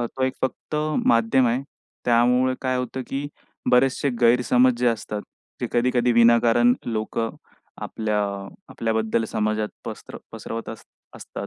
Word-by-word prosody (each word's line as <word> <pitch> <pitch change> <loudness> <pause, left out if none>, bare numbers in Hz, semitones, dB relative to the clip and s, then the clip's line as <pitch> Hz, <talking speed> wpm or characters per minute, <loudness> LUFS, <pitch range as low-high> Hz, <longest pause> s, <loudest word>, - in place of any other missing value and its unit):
तो 120 +2 -4
एक 130 0 -1
फक्त 130 +3 -3 0.3
माध्यम 115 +3 +4
आहे. 125 +4 0 0.4
त्यामुळे 125 +2 +3
काय 130 -1 0
होतं, 125 +1 -3
की 140 +1 -3 0.4
बरेचसे 130 +2 +3
गैरसमज 125 +1 +4
जे 125 - +1
असतात 105 -2 -3 0.4
ते - - -1
कधी-कधी 120 0 +2
विनाकारण 120 +1 +5
लोकं 115 0 -2 0.5
आपल्या 110 -1 -2 0.5
आपल्याबद्दल 110 0 -1
समाजात 110 0 -1 0.2
पसर - - -8 0.2
पसरवत 115 0 -6
अस 110 - -9 0.3
असतात. - - -7
120 Hz, 125 wpm, -23 LUFS, 115-125 Hz, 0.5 s, विनाकारण